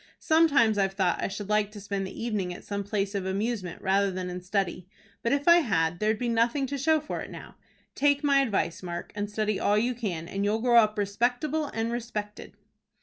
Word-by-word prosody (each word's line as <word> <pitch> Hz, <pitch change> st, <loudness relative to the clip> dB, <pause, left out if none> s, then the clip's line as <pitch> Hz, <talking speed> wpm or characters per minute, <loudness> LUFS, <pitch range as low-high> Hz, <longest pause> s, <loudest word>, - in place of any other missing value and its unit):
Sometimes 280 Hz, -10 st, +3 dB
I've 195 Hz, -1 st, +1 dB
thought 185 Hz, -3 st, +1 dB
I -, -, 0 dB
should 200 Hz, +1 st, -6 dB
like 210 Hz, -1 st, +2 dB
to 210 Hz, -, -8 dB
spend 200 Hz, -1 st, -3 dB
the 205 Hz, -, -7 dB
evening 205 Hz, -6 st, -1 dB
at 175 Hz, -, -9 dB
some 200 Hz, 0 st, -3 dB
place 200 Hz, 0 st, -2 dB
of 195 Hz, -2 st, -2 dB
amusement 195 Hz, -2 st, -3 dB
rather 195 Hz, +1 st, +2 dB
than 185 Hz, -1 st, -4 dB
in 180 Hz, 0 st, -6 dB
study; 185 Hz, -1 st, -2 dB, 0.3 s
but 235 Hz, -, 0 dB
if 285 Hz, +2 st, 0 dB
I 340 Hz, 0 st, +9 dB
had, 175 Hz, -, +1 dB
there'd 215 Hz, 0 st, +1 dB
be 245 Hz, -, -2 dB
nothing 235 Hz, +4 st, +1 dB
to 280 Hz, +2 st, -4 dB
show 315 Hz, +3 st, +3 dB
for 305 Hz, -, -5 dB
it -, -, -7 dB
now. -, -, -10 dB, 0.4 s
Take 285 Hz, +1 st, +2 dB
my 280 Hz, -1 st, +4 dB
advice, 205 Hz, -10 st, 0 dB
Mark, 175 Hz, -1 st, -6 dB
and 205 Hz, 0 st, -3 dB
study 215 Hz, -1 st, -1 dB
all 205 Hz, -, +2 dB
you 240 Hz, +4 st, +1 dB
can, 185 Hz, -9 st, -4 dB
and 195 Hz, +2 st, -3 dB
you'll 205 Hz, +2 st, +1 dB
grow 240 Hz, 0 st, +4 dB
up 215 Hz, -1 st, +2 dB
respectable 245 Hz, +9 st, 0 dB
and 225 Hz, -3 st, -2 dB
respected." 220 Hz, -3 st, -5 dB
210 Hz, 215 wpm, -27 LUFS, 195-240 Hz, 0.4 s, I